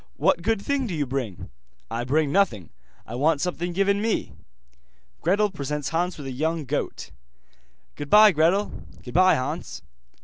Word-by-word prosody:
What 170 - +2
good 220 +4 +1
thing 270 +4 -1
do 180 - -4
you 145 -2 0
bring?' 125 -8 -5 0.4
'I 120 +1 -2
bring 145 +2 +1
nothing, 130 - +1 0.3
I 110 - -9
want 145 +4 +2
something 175 +2 -2
given 200 +3 +1
me.' 220 0 -1 0.9
Gretel 200 +4 +2
presents 145 -4 -3
Hans 175 +2 -1
with 145 - -8
a 135 - -4
young 155 +4 -2
goat. 140 +3 -4 0.8
'Goodbye, 210 +9 +6
Gretel.' 175 +6 +2 0.3
'Goodbye, 185 +9 +4
Hans. 130 - -4
165 Hz, 145 wpm, -24 LUFS, 140-195 Hz, 0.9 s, Goodbye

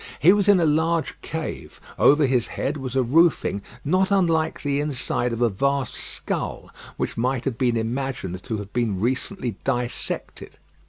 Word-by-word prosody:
He 180 +5 +7
was 205 -1 +1
in 200 -2 +6
a 170 - +3
large 160 +2 +1
cave. 160 -1 -6 0.2
Over 145 +1 +6
his 125 -3 +1
head 145 - -2
was 130 -2 -5
a 130 - +3
roofing 145 - +3 0.2
not 185 +5 +2
unlike 170 -5 +1
the 140 -1 0
inside 135 -4 -1
of 115 +1 -1
a 120 - +4
vast 135 +5 0
skull, - - -4 0.3
which - - -3
might 125 +1 0
have 130 -4 -2
been 120 -2 +2
imagined 115 -5 -3
to 110 - -4
have 105 -1 -8
been 115 -6 0
recently 125 - -1
dissected. 125 -2 -3
135 Hz, 165 wpm, -24 LUFS, 120-160 Hz, 0.3 s, He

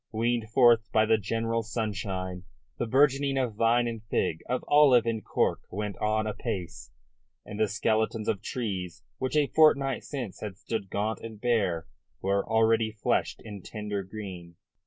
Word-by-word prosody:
Weaned 115 0 0
forth 115 -3 +4
by 110 - +4
the 110 0 +3
generous 115 +1 -2
sunshine, 95 -5 -3 0.3
the 120 - -1
burgeoning 135 +2 +3
of 125 -4 0
vine 115 +3 +3
and 115 -2 -4
fig, 80 -6 -1
of 125 0 -1
olive 140 -5 +6
and 115 -2 -2
cork - - +1
went 105 +1 -4
on 110 0 +1
apace, 95 -4 -4 0.6
and 105 0 -7
the 110 - +3
skeletons 110 +1 0
of 100 - 0
trees 95 -8 -4 0.2
which 130 +3 -2
a 150 -1 +4
fortnight 140 -3 +3
since 125 -9 -6
had 100 -3 -6
stood 105 -3 -4
gaunt 105 +3 -1
and 110 -2 -9
bare 105 -9 +1 0.3
were 100 +1 +1
already 110 0 +2
fleshed 110 - -1
in 105 -3 -8
tender 105 0 -4
green. 95 -4 -8
110 Hz, 155 wpm, -28 LUFS, 100-120 Hz, 0.6 s, olive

